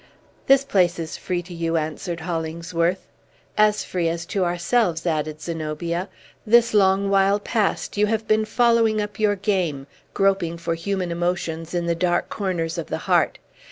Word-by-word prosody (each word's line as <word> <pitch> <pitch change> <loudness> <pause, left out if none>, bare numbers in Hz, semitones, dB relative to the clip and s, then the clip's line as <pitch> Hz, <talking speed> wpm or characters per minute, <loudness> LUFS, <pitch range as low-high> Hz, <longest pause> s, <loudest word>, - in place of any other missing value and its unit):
"This 275 0 +6
place 185 -9 +2
is 165 -2 -5
free 175 -1 -3
to 175 +1 -10
you," 165 -1 -1
answered 160 +2 -3
Hollingsworth. 170 +1 -2 0.5
"As 210 0 +3
free 175 -3 -1
as 165 0 -3
to 195 -3 +1
ourselves," 175 0 0
added 155 -2 -1
Zenobia. 170 +2 -3 0.3
"This 235 +1 +4
long 195 -1 +3
while 195 +1 +3
past, 210 -1 -1
you 210 +1 +3
have 220 0 -1
been 215 0 +3
following 230 -2 +3
up 210 0 -4
your 210 -1 +3
game, 185 -9 -1 0.3
groping 195 -4 +1
for 170 0 -2
human 180 +1 -2
emotions 170 -1 -2
in 175 -1 0
the 170 - +1
dark 175 +1 0
corners 175 -4 -2
of 165 - -5
the - - -2
heart. - - +2
180 Hz, 160 wpm, -23 LUFS, 165-205 Hz, 0.5 s, This